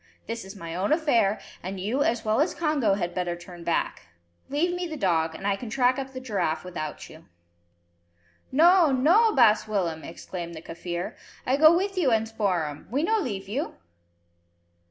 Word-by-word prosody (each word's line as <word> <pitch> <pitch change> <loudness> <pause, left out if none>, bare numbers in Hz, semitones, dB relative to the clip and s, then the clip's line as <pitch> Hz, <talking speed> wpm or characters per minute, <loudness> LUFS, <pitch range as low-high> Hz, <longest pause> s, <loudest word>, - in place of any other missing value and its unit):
This 230 0 -5
is 190 +2 -10
my 170 -4 -7
own 185 +7 -1
affair, 235 - +2 0.2
and 190 +2 -5
you 220 +9 -1
as 235 -4 +1
well 220 +5 +2
as 325 - 0
Congo 290 -11 +1
had 175 -3 -3
better 175 -1 -2
turn 175 0 -11
back. 165 - -1 0.4
Leave 320 +6 +1
me 355 0 -3
the 315 -2 -6
dog, 165 - +1
and 195 - -8
I 200 -1 +2
can 225 +3 -7
track 255 +2 +2
up 265 0 -5
the 260 - -6
giraffe 200 -10 -1
without 170 -4 -6
you." 160 +1 -15 1.3
"No! 335 +3 +6
no!! 345 - +4
baas 225 -5 +5
Willem," 175 -7 -1
exclaimed 170 0 -7
the 160 - -8
Kaffir. 175 +1 -5 0.3
"I 260 - +2
go 310 +4 +7
with 390 +1 -1
you 300 -7 +3
and 225 0 +2
Spoor'em. 180 -9 -2
We 275 +6 0
no 440 +5 +2
leave 205 - -4
you." 245 +9 -3
220 Hz, 180 wpm, -26 LUFS, 180-285 Hz, 1.3 s, go